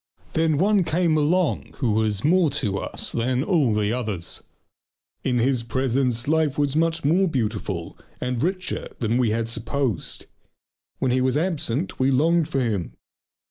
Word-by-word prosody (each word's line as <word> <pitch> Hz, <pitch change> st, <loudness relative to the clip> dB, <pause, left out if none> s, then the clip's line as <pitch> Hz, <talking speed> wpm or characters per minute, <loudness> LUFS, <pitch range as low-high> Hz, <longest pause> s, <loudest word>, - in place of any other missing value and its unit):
Then 160 Hz, -2 st, +2 dB
one 200 Hz, +3 st, +3 dB
came 165 Hz, 0 st, +1 dB
along 160 Hz, +4 st, +1 dB
who 125 Hz, -6 st, 0 dB
was 105 Hz, -1 st, +1 dB
more 170 Hz, +1 st, +4 dB
to 105 Hz, -9 st, -1 dB
us -, -, -2 dB
than 125 Hz, +2 st, 0 dB
all 160 Hz, -, +2 dB
the 105 Hz, 0 st, +1 dB
others. 105 Hz, -8 st, -3 dB, 0.8 s
In 125 Hz, -2 st, +1 dB
his 125 Hz, +1 st, +2 dB
presence 125 Hz, 0 st, 0 dB
life 155 Hz, -2 st, +1 dB
was 145 Hz, -1 st, +1 dB
much 165 Hz, -1 st, +1 dB
more 180 Hz, +6 st, +3 dB
beautiful 105 Hz, -, -3 dB, 0.2 s
and 125 Hz, -1 st, -2 dB
richer 185 Hz, +2 st, -2 dB
than 115 Hz, +1 st, 0 dB
we 120 Hz, -3 st, +2 dB
had 115 Hz, +1 st, -1 dB
supposed; 120 Hz, -, -2 dB, 0.7 s
when 130 Hz, -, 0 dB
he 130 Hz, +1 st, +2 dB
was 130 Hz, +2 st, +2 dB
absent 160 Hz, -2 st, -1 dB
we 130 Hz, +1 st, +3 dB
longed 160 Hz, +4 st, +2 dB
for 135 Hz, -4 st, 0 dB
him. 105 Hz, -8 st, -2 dB
130 Hz, 155 wpm, -24 LUFS, 115-160 Hz, 0.8 s, more